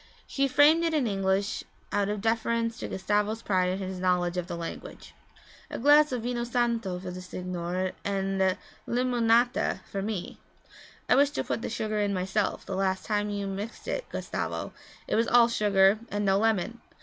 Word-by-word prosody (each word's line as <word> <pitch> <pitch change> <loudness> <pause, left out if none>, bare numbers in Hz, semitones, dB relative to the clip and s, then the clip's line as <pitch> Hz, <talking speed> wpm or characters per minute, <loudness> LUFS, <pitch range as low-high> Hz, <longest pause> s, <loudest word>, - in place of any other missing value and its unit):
She 275 0 0
framed 290 +5 +5
it 330 -1 +1
in 290 -4 +2
English 195 0 0 0.3
out 200 0 +1
of 210 -1 -2
deference 230 +1 0
to - - -4
Gustavo's 210 +3 -1
pride 185 -2 +1
in 185 - -1
his 185 -1 -5
knowledge 180 -1 +1
of 180 -1 -2
the 175 -2 -5
language. 165 0 -8 0.6
'A - - -5
glass 295 +3 +5
of 245 -3 -2
vino 240 0 -2
santo 235 -5 0
for 180 0 -6
the 180 0 -7
signore 180 0 -3
and 195 -1 0 0.3
limonata 240 -3 +2
for 195 - -2
me. 200 -3 -4 0.7
I - - +4
wish 280 +2 +5
to 290 - -3
put - - -3
the - - -3
sugar 215 -2 -2
in 205 -1 0
myself, 190 +3 -1
the 190 - -4
last 190 0 0
time 210 -1 0
you 200 -1 -3
mixed 200 - -6
it, - - -3
Gustavo, - - -4 0.3
it - - -2
was 230 +1 +2
all 240 -1 +6
sugar 205 -3 +3
and 205 0 -2
no 195 0 +3
lemon. 225 +1 0
205 Hz, 180 wpm, -28 LUFS, 190-235 Hz, 0.7 s, all